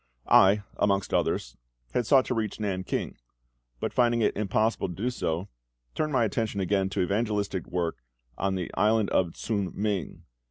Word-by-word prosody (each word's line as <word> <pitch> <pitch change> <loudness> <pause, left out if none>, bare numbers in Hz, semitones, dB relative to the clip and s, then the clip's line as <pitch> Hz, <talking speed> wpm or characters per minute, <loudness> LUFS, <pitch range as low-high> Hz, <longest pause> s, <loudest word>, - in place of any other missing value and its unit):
I, 100 +2 +5
amongst 100 -1 +1
others, - - 0 0.4
had 120 - 0
sought 135 -1 +5
to - - -1
reach 110 -3 -2
Nan 95 -3 -2
king; - - -3 0.6
but - - -3
finding 120 -1 +3
it - - +2
impossible 110 +2 0
to 90 - -7
do 120 +7 -1
so, 85 -5 -2 0.5
turned 155 -1 -1
my 130 -4 +3
attention 110 -1 -2
again 95 0 +1
to 95 - -1
evangelistic 100 -1 -1
work 85 -2 -2 0.4
on 95 0 -1
the 90 -2 -3
island 110 0 +2
of 85 -3 +2
Ts'ung 100 -5 -2
ming. 100 -4 -2
100 Hz, 165 wpm, -27 LUFS, 95-110 Hz, 0.6 s, I